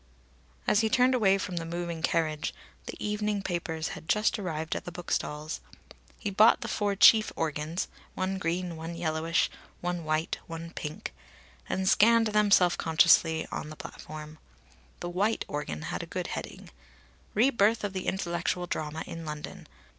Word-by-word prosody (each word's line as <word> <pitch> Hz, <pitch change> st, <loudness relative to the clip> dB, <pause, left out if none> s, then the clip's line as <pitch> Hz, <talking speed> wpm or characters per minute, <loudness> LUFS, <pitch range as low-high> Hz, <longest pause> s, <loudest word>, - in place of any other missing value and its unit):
As 205 Hz, -, +4 dB
he 220 Hz, -1 st, +2 dB
turned 255 Hz, +3 st, +4 dB
away 200 Hz, -6 st, +4 dB
from 185 Hz, -2 st, -4 dB
the 165 Hz, -, -1 dB
moving 170 Hz, 0 st, -4 dB
carriage, 155 Hz, -2 st, 0 dB, 0.3 s
the -, -, -5 dB
evening 210 Hz, -1 st, -1 dB
papers 165 Hz, -3 st, -2 dB
had 160 Hz, -, -9 dB
just 210 Hz, 0 st, +2 dB
arrived 160 Hz, -4 st, -3 dB
at -, -, -4 dB
the 180 Hz, -, -5 dB
bookstalls. 155 Hz, -3 st, -3 dB, 0.6 s
He 205 Hz, -, -3 dB
bought 215 Hz, +4 st, +6 dB
the -, -, -4 dB
four 205 Hz, -1 st, 0 dB
chief 215 Hz, +2 st, +7 dB
organs 155 Hz, +2 st, -2 dB, 0.3 s
one 190 Hz, 0 st, -1 dB
green, 175 Hz, 0 st, -2 dB
one 165 Hz, +1 st, -6 dB
yellowish, 165 Hz, 0 st, +1 dB, 0.3 s
one 175 Hz, -1 st, -2 dB
white, 155 Hz, +1 st, -1 dB
one 165 Hz, 0 st, -7 dB
pink 150 Hz, -2 st, -6 dB, 0.6 s
and 190 Hz, 0 st, 0 dB
scanned 230 Hz, +3 st, +6 dB
them 210 Hz, -1 st, +3 dB
self 180 Hz, -3 st, +5 dB
consciously 160 Hz, 0 st, +4 dB
on 150 Hz, -, -4 dB
the 155 Hz, -, -8 dB
platform. 155 Hz, 0 st, -9 dB, 0.6 s
The 175 Hz, -, -3 dB
white 205 Hz, +5 st, +1 dB
organ 145 Hz, -, -4 dB
had -, -, -3 dB
a -, -, -7 dB
good -, -, -3 dB
heading: -, -, -7 dB, 0.6 s
"Re 245 Hz, +6 st, +5 dB
birth 220 Hz, -1 st, +3 dB
of 205 Hz, -2 st, -2 dB
the 185 Hz, -1 st, -4 dB
intellectual 175 Hz, -1 st, -1 dB
drama 155 Hz, -2 st, -3 dB
in 165 Hz, 0 st, -7 dB
London. 150 Hz, -1 st, -7 dB
175 Hz, 160 wpm, -29 LUFS, 160-200 Hz, 0.6 s, chief